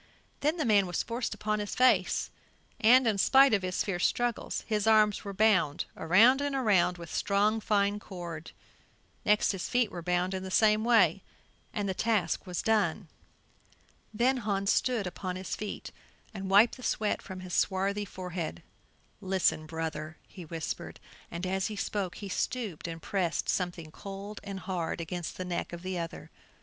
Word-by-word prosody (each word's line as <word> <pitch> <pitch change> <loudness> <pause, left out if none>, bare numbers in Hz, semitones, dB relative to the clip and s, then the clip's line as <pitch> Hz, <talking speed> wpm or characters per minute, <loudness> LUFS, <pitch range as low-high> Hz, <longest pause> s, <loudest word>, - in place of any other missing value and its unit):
Then 305 +4 +1
the 310 - 0
man 205 -4 +4
was 175 - -1
forced 235 +1 -3
upon 215 0 -1
his 205 -1 -4
face 255 0 +3 0.5
and, 250 +4 +6
in 215 -3 +1
spite 270 +3 +6
of 200 - +3
his 185 0 -1
fierce 180 -3 +1
struggles, 240 -1 -2
his 215 -1 -1
arms 215 -2 +4
were 200 - -5
bound 190 -7 +2
around 225 - +5
and 285 -1 -1
around 195 -8 +3
with 170 -1 -9
strong 210 +2 +2
fine 205 -1 +1
cord; 170 -5 -7 0.8
next 210 0 +4
his 195 -3 -4
feet 245 -4 +1
were 175 - -6
bound 180 +2 0
in 190 - -3
the 190 - -6
same 215 +2 +4
way, 235 -1 +4 0.5
and 205 -2 -2
the 190 - 0
task 215 -2 0
was 180 -1 -3
done. 205 -5 +1 1.0
Then 245 +4 +2
Hans 200 -3 0
stood 245 -6 +1
upon 180 +1 -4
his 185 +1 -4
feet, 210 -1 -6 0.4
and 195 -2 -5
wiped 210 +6 +5
the - - -12
sweat 215 -3 -1
from 185 -1 -8
his 180 -1 -8
swarthy 200 +1 +1
forehead. 180 -4 -5 0.6
"Listen, 185 -5 0
brother," 160 -1 -5
he 180 -3 -10
whispered, 160 0 -5 0.3
and 170 +2 -5
as 190 0 0
he 215 - -5
spoke 195 -2 -3
he 205 - -7
stooped 200 -3 -3
and 165 -1 -7
pressed 180 -4 -1
something 175 -4 -2
cold 200 +4 -8
and 195 -2 -6
hard 175 -4 -3
against 170 0 -5
the 185 - -4
neck 175 -1 -3
of 175 0 -8
the 185 -1 -3
other. 165 -1 -7
195 Hz, 170 wpm, -30 LUFS, 180-215 Hz, 1.0 s, and